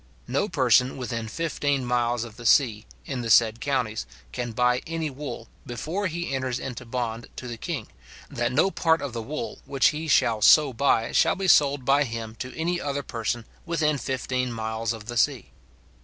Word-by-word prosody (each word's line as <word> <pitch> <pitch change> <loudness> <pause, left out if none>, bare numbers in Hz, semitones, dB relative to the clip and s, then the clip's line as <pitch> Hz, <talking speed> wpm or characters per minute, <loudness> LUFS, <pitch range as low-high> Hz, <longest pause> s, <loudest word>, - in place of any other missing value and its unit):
No 205 - 0
person 130 -5 +3
within 115 -3 -4
fifteen 145 -1 -1
miles 120 -1 +1
of 115 -3 -9
the 120 0 -11
sea, 110 -5 +3 0.2
in 130 -3 -3
the 115 - -4
said 115 0 +5
counties, 115 - -1 0.2
can 120 -2 -4
buy 125 +2 +2
any 165 -2 -2
wool, 130 -4 -7 0.2
before 160 - -3
he 170 -3 -4
enters 130 -2 -1
into 130 -2 -6
bond 115 -1 -3
to 125 - -7
the 120 - -5
king, 135 -2 -4 0.4
that 120 +1 -2
no 155 +9 +3
part 160 -3 +2
of 140 -4 -4
the 115 - -3
wool 150 +7 -5
which 135 -1 +4
he 160 +1 -4
shall 115 -6 +3
so 145 +4 +6
buy 115 -2 +2
shall - - +3
be 195 0 -2
sold 140 -5 +4
by 140 +2 +4
him 115 -3 -5
to 130 - -5
any 175 +2 -1
other 140 0 -2
person 115 -1 -3 0.2
within 155 -4 0
fifteen 130 -1 -2
miles 110 0 -2
of 110 -2 -6
the 120 +1 -5
sea. 120 - +1
125 Hz, 185 wpm, -25 LUFS, 115-145 Hz, 0.4 s, so